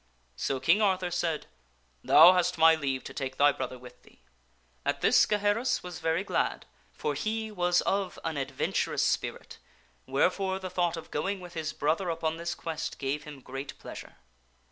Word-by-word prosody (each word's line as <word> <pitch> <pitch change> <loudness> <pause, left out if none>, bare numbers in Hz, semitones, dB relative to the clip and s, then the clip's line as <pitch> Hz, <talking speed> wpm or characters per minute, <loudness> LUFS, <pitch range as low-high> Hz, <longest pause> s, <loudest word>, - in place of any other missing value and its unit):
So 130 - -2
King 165 +11 +3
Arthur 185 -3 +1
said, 170 -3 -1 0.3
" - - -39 0.2
Thou 170 +4 +8
hast 180 -1 +1
my 165 0 +7
leave 135 -4 -2
to - - -8
take 130 -1 -4
thy 145 0 +6
brother 130 -2 -5
with 125 0 -14
thee." - - -23 0.6
At - - -1
this - - +5
Gaheris 210 +4 +1
was 180 -2 -7
very 165 +3 0
glad, 205 - -1 0.3
for 455 - -3
he 220 0 -2
was 175 -3 +2
of 195 -1 -1
an 160 -1 -2
adventurous 135 -1 -1
spirit, - - -2 0.5
wherefore 190 +8 +1
the 185 -1 -6
thought 175 -2 0
of 165 - -9
going 195 +6 -2
with 180 -1 -10
his 155 -2 -3
brother 160 +6 0
upon 160 -1 -2
this 170 +1 -3
quest 160 -2 -5
gave 145 +3 -3
him 145 -3 -10
great 135 +2 -7
pleasure. - - -10
165 Hz, 175 wpm, -29 LUFS, 145-185 Hz, 0.6 s, Thou